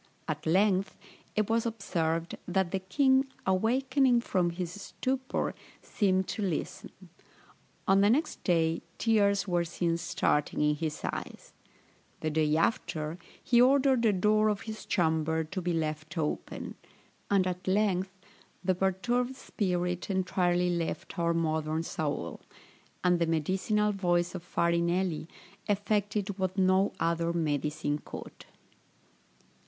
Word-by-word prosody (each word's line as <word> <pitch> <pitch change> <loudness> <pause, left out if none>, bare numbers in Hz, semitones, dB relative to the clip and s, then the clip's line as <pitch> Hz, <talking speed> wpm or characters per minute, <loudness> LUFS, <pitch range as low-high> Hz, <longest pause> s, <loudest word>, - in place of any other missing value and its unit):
At 155 0 -3
length, 190 +2 +2 0.4
it 215 -1 +1
was 225 0 +2
observed, 170 -7 -2
that 185 -1 0
the 195 - 0
king, 265 +8 +3 0.2
awakening 250 +6 +3
from 180 -6 +1
his 180 +3 -5
stupor, 260 +3 -2 0.3
seemed 190 -3 +1
to - - -3
listen; 185 -6 -3 1.0
on 195 +1 +5
the 205 - +5
next 280 +8 0
day 165 -2 +2 0.2
tears 205 -3 +2
were 175 -2 +1
seen 170 0 -1
starting 150 -3 0
in 150 0 +3
his 150 0 -4
eyes; - - -5 0.7
the 155 - -1
day 155 0 +2
after 160 -3 -1 0.2
he 240 -1 +4
ordered 265 -1 +4
the 225 -2 +4
door 215 +3 +3
of 205 -2 -1
his 220 -1 -7
chamber 160 -2 +1
to 185 +4 -5
be 175 0 -1
left 155 0 -3
open 150 -2 -3 0.6
and 195 -2 +3
at 180 0 -4
length 190 -1 +2 0.5
the 185 0 +2
perturbed 240 +8 0
spirit 180 -7 -2
entirely 180 -2 +1
left 170 +2 -3
our 170 0 +2
modern 160 -1 0
Saul, 160 -4 -3 0.6
and 180 -1 +3
the 170 - +2
medicinal 190 +6 +1
voice 175 -3 +1
of 180 - -5
Farinelli 170 0 0 0.4
effected 205 -1 0
what 185 0 -1
no 190 +1 +3
other 170 0 +1
medicine 150 -2 -1
could. - - -9
185 Hz, 125 wpm, -30 LUFS, 165-205 Hz, 1.0 s, on